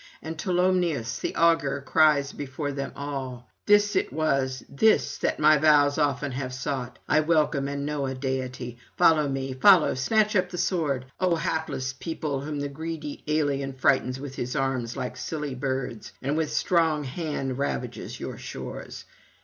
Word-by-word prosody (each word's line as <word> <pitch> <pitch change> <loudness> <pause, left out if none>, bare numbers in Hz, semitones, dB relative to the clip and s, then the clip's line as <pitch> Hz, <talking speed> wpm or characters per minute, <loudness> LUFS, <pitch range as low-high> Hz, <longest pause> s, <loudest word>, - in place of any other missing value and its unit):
And 160 +1 -5
Tolumnius 175 - 0
the - - -3
augur 165 -4 +3
cries 150 -3 +4
before 145 +1 -4
them 140 0 -4
all: 135 -4 -5 0.2
'This 205 0 +5
it - - +1
was, 135 -3 0
this, 220 +10 +2
that - - 0
my 155 0 +6
vows 145 -2 +4
often 140 -1 0
have 130 0 -4
sought; 130 -1 -4
I - - +4
welcome 155 -3 +2
and 140 0 -3
know 145 -2 -2
a 130 - -3
deity; 130 -2 -4 0.2
[261 155 -4 +5
294]follow - - -2
me, 135 -1 -3
follow, 190 -6 +7
snatch 210 - +2
up 185 -2 +2
the 180 - -6
sword, 150 -9 0
O 185 -2 +2
hapless 155 -5 -2
people 145 -1 -3
whom 145 0 -4
the 145 - -1
greedy 155 +1 -6
alien 145 -3 0
frightens 130 0 +1
with 140 -1 -7
his 125 0 -4
arms 130 -4 -1
like 125 0 -4
silly 150 +2 -4
birds, 130 -3 -4
and 140 +3 -1
with 155 -1 0
strong 160 -2 +2
hand 135 -2 -3
ravages 140 - -3
your - - -6
shores. - - -7
145 Hz, 165 wpm, -26 LUFS, 130-160 Hz, 0.2 s, follow